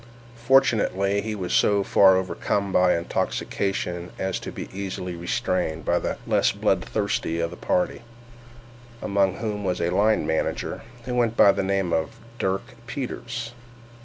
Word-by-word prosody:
Fortunately 105 -7 +3
he 110 +1 -3
was 90 -3 -3
so 100 -1 +4
far 95 -1 +6
overcome 95 +1 -1
by 90 -2 +4
intoxication 90 +1 -2
as 95 -1 -2
to - - -7
be - - -6
easily 95 -2 -4
restrained 85 -1 -1
by 85 - +2
the - - -3
less - - +3
bloodthirsty 80 +1 -1
of 85 0 -1
the - - -7
party, 180 - -1 1.0
among 100 -2 +2
whom 105 -2 -3
was 90 -2 -1
a 85 0 0
line 105 -2 +3
manager, 80 0 -2 0.2
who 125 - -3
went 120 -2 +1
by 100 - +8
the - - -1
name 95 -2 0
of 80 -1 -1 0.2
Dirk 95 +2 0 0.2
Peters. 120 -3 -5
95 Hz, 145 wpm, -24 LUFS, 90-105 Hz, 1.0 s, by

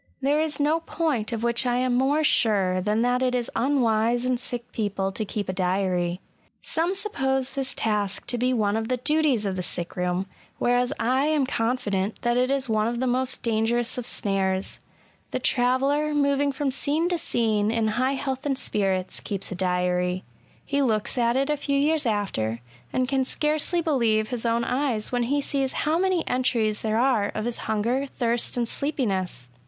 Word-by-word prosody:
There 285 +3 +2
is 310 -2 -1
no 300 +3 +2
point 310 -9 -1
of 230 -1 -3
which 235 +1 +2
I 245 -1 +1
am 250 0 +1
more 275 +5 +2
sure 195 -9 +3
than 210 +4 +1
that 245 +1 +1
it 255 -1 +1
is 245 -2 -2
unwise 240 -2 +2
in 255 -1 +1
sick 245 -1 -3
people 200 -3 -2
to 215 - -2
keep 205 -1 -4
a 185 - -2
diary. 180 -1 0 0.4
Some 340 +4 0
suppose 270 -10 0
this 270 -1 -3
task 205 -2 -1
to 245 0 -2
be 250 +1 +2
one 215 -4 +1
of 220 0 -1
the 255 +1 0
duties 285 -4 +1
of 195 -1 -1
the 185 - -2
sick 175 -1 -4
room; 180 +1 -1 0.3
whereas 245 +1 +2
I 260 +4 +2
am 305 -3 +2
confident 225 -5 -1
that 240 0 +2
it 250 +1 +2
is 275 -1 0
one 215 -1 +1
of 235 0 -2
the 260 - 0
most 255 +1 0
dangerous 230 +1 +1
of 245 - -2
snares. 190 -1 -1 0.5
The - - -2
traveller, 275 +4 +1
moving 280 0 +2
from 275 0 -1
scene 295 +5 +1
to 350 -2 0
scene 220 -9 +1
in 225 -1 +1
high 255 +5 +1
health 265 -1 -3
and 270 -2 0
spirits, 190 -6 -1
keeps 200 -1 -3
a - - -3
diary; 180 0 0 0.4
he 280 0 0
looks 220 -6 +1
at 235 -1 +2
it 275 +3 +1
a - - +2
few 280 0 -1
years 300 0 +2
after, 115 - -1 0.3
and 255 0 0
can 270 0 +1
scarcely 305 +5 0
believe 225 -8 +1
his 240 -2 -1
own 230 +1 +1
eyes 250 -4 -1
when 245 -1 0
he 285 +1 +2
sees 275 -2 -1
how 315 +2 0
many 370 -2 +1
entries 230 -4 +1
there 220 0 0
are 235 -5 +2
of 215 - -2
his* 240 -1 -2
hunger, 235 +6 0
thirst, 240 -2 -1
and 240 -1 0
sleepiness. 190 - -2
245 Hz, 190 wpm, -25 LUFS, 210-275 Hz, 0.5 s, sure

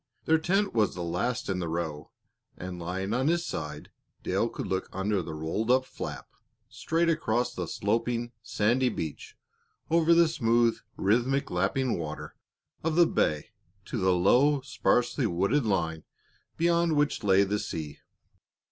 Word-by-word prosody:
Their 160 0 +4
tent 195 +5 +1
was 110 -3 +2
the 90 - -4
last 90 +8 -2
in 95 -1 -1
the 85 - -2
row, 80 -2 -4 0.5
and 90 -1 -6
lying 95 +4 -3
on 130 +3 +1
his 170 +1 +1
side, 75 -1 -6 0.3
Dale - - 0
could - - -5
look 95 0 -2
under 95 0 0
the 80 -2 -6
rolled 80 +9 -2
up 130 +1 +4
flap 75 - -7 0.4
straight 165 +1 -1
across 125 -7 0
the 90 -6 -4
sloping, 115 +5 -1
sandy 120 +2 +1
beach, 80 -9 -6 0.5
over 165 0 +5
the 170 0 +6
smooth, 120 -6 +2 0.2
rhythmic 125 +7 +1
lapping 130 -7 0
water 75 -2 -6 0.5
of 160 0 0
the 175 0 +6
bay 75 - 0 0.3
to - - -4
the 95 0 +3
low, 135 +11 +4
sparsely 130 -1 +1
wooded 105 +9 +1
line 80 -5 -1 0.5
beyond 170 -1 +2
which 145 -4 +1
lay 100 -1 +5
the 105 +1 -1
sea. 75 -6 -5
115 Hz, 150 wpm, -28 LUFS, 90-140 Hz, 0.5 s, the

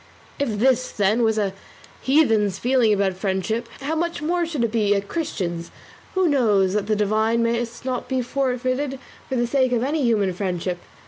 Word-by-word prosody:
If 235 -7 -1
this, 255 +2 +2
then, 210 +3 +1
was 220 -1 +2
a 200 -3 0 0.5
heathen's 225 -9 +3
feeling 245 -1 +2
about 200 -2 +2
friendship, 195 +5 -2
how 285 +4 -2
much 335 0 -1
more 340 +3 0
should 300 -7 -2
it 230 - 0
be 210 -3 +2
a 200 - +1
Christian's, 190 - -4 0.5
who 375 -1 +3
knows 210 - +3
that 205 -1 -1
the 215 - +2
divine 220 +3 +1
must 235 +1 -2
not 255 -2 -2
be 260 -1 0
forfeited 255 +1 -1 0.3
for 265 - -1
the 240 -1 +1
sake 255 0 +1
of 240 -1 +1
any 295 +3 0
human 210 -7 +2
friendship? 180 -1 -2
230 Hz, 180 wpm, -23 LUFS, 205-265 Hz, 0.5 s, heathen's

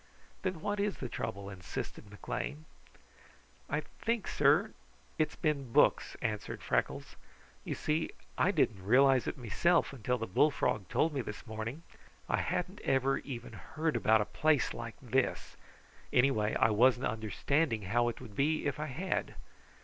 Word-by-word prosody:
"Then 185 -4 -2
what 205 +1 -1
is 205 0 0
the 130 - -4
trouble?" 110 -4 -4
insisted 95 +3 -6
McLean. 145 +8 -5 1.0
"I - - 0 0.2
think, 230 -3 -1
sir, 150 +9 +3 0.5
it's 155 - +1
been 140 -5 -1
books," - - +3
answered 105 -2 -3
Freckles. - - -1 0.5
"You - - -3
see, 155 +1 0 0.3
I - - +3
didn't 120 - +1
realize 130 +3 +5
it - - -3
meself 140 - +2
until 125 0 -1
the 110 - -3
bullfrog 110 -2 +1
told 160 0 +2
me 135 - -1
this 105 -3 -7
morning. 110 +7 -5 0.4
I - - +1
hadn't - - -2
ever 135 0 +2
even 120 -4 -7
heard 160 -2 -2
about 110 -1 +4
a - - 0
place 155 +4 +2
like 115 -1 -6
this. 130 +1 0 0.6
Anyway, 125 -5 +3
I 110 - +4
wasn't 125 +4 +4
understanding 110 +3 0
how 120 +6 +2
it 120 - -6
would 105 - -11
be, 155 +5 +1
if 145 0 -1
I 155 - -2
had. 170 +8 -2
130 Hz, 150 wpm, -32 LUFS, 110-155 Hz, 1.0 s, realize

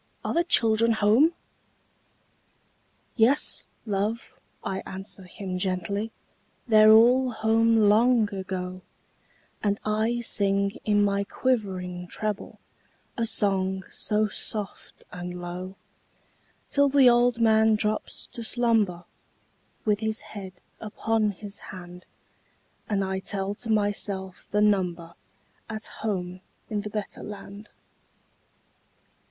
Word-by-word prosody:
are - - -1
the 340 - +3
children 230 -7 +4
home?" 220 +9 +4 1.8
"Yes, 250 +5 +2 0.2
love!" 210 +2 -2 0.3
I 190 - -2
answer 190 0 -7
him 185 0 -5
gently, 195 +4 -2 0.6
"They're 215 -1 +7
all 245 +4 +6
home 225 0 +2
long 220 +1 +4
ago;" 185 -1 -5 0.8
And 205 -1 0
I 220 +3 0
sing, 200 -2 0
in 205 -1 +3
my 200 0 +1
quivering 190 -7 -2
treble, 210 +3 -4 0.6
A 230 -2 0
song 190 -3 0
so 215 0 0
soft 210 -1 -5
and 180 0 -6
low, 180 +2 -6 1.0
Till 285 0 +4
the 275 -2 +6
old 240 0 +4
man 220 -1 +4
drops 210 0 -2
to 240 -2 -5
slumber, 220 -7 +2 0.8
With 210 -2 +2
his 220 0 -2
head 195 -3 -9 0.3
upon 220 0 0
his 205 0 -8
hand, 180 -1 -11 0.8
And 200 -2 +1
I 190 0 -2
tell 195 0 -3
to 225 +2 -9
myself 205 -3 -1
the 210 - +1
number 180 -5 +1 0.6
At 215 -1 -5 0.2
home 185 -4 -3 0.3
in 210 -1 -1
the 210 - -6
better 210 -1 -5
land. 205 0 -9
210 Hz, 110 wpm, -26 LUFS, 190-225 Hz, 1.8 s, They're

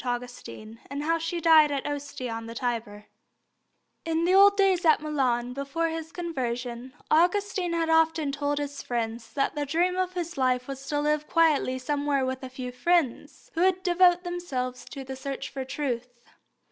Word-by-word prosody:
AUGUSTINE, 245 -3 -6
AND 280 +1 -4
HOW 330 +2 +1
SHE 330 +1 -3
DIED 315 -2 +6
AT 275 -2 -2
OSTIA 285 -4 -4
ON 225 0 -5
THE 230 - -8
TIBER 225 -4 -3 1.0
In 330 0 0
the 365 - +3
old 400 +1 +7
days 385 -2 +3
at 315 -2 +5
Milan, 255 -5 0
before 280 +5 -2
his 325 0 -5
conversion, 255 -6 -4 0.2
Augustine 360 +2 +2
had 330 -1 0
often 320 -2 +3
told 285 +1 -1
his 285 -1 -4
friends 230 -1 -3
that 275 - 0
the 295 - -2
dream 345 +6 +1
of 370 0 -1
his 345 -4 -4
life 255 -1 +1
was 275 0 -7
to 290 +1 0
live 300 0 0
quietly 310 -6 +3
somewhere 285 +1 0
with 260 0 -3
a 260 - -7
few 255 -1 -6
friends, 275 +1 0
who 330 - -1
would 370 0 +2
devote 355 -1 +4
themselves 270 -9 -4
to 275 - -8
the 265 0 -6
search 270 +1 -5
for 270 -1 -4
truth. 255 -3 -3
290 Hz, 175 wpm, -27 LUFS, 255-330 Hz, 1.0 s, old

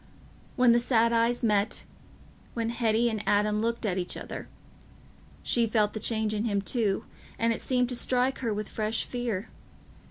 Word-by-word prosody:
When 250 -1 +5
the 235 - +5
sad 235 -1 +3
eyes 230 +1 +2
met—when 220 +2 -3
Hetty 230 0 +2
and 220 -3 -1
Adam 210 +1 +2
looked 230 +1 -1
at 190 -3 0
each 180 - -3
other—she 235 -2 -5
felt 215 -2 +2
the 220 - -4
change 220 0 0
in 215 +1 -1
him 205 -3 +1
too, 200 -1 0 0.3
and 230 0 +2
it - - -6
seemed 250 -2 +1
to 250 - -3
strike 255 +2 0
her 235 -4 -1
with 210 0 -3
fresh 215 +1 -1
fear. 235 -4 -3
230 Hz, 160 wpm, -28 LUFS, 210-235 Hz, 0.3 s, When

